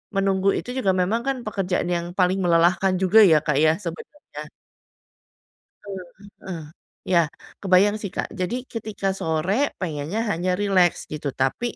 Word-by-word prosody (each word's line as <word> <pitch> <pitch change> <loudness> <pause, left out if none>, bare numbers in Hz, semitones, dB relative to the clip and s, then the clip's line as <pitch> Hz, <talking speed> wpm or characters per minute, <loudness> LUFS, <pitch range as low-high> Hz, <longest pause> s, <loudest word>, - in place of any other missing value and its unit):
menunggu 195 0 +2
itu - - -6
juga 200 -7 0
memang 220 +6 0
kan 270 -1 0
pekerjaan 190 -4 -1
yang 170 0 -2
paling 185 +1 +3
melelahkan 175 +3 +3
juga 190 +4 +5
ya 155 - +6
Kak 150 -2 +1
ya 155 0 +5
sebenernya. 200 - -9 1.4
Eee, 195 -2 -6 0.4
heeh. 165 -4 -5 0.4
Ya, 175 -2 +3 0.4
kebayang 195 +2 +4
sih 205 - -4
Kak. - - -3
Jadi 210 +6 -3
ketika 215 -5 -4
sore 190 - -1
pengennya 165 +5 -3
hanya 180 +2 0
rileks 190 -3 +2
gitu 150 -2 -3
tapi, 135 - -1
185 Hz, 145 wpm, -23 LUFS, 170-205 Hz, 1.4 s, ya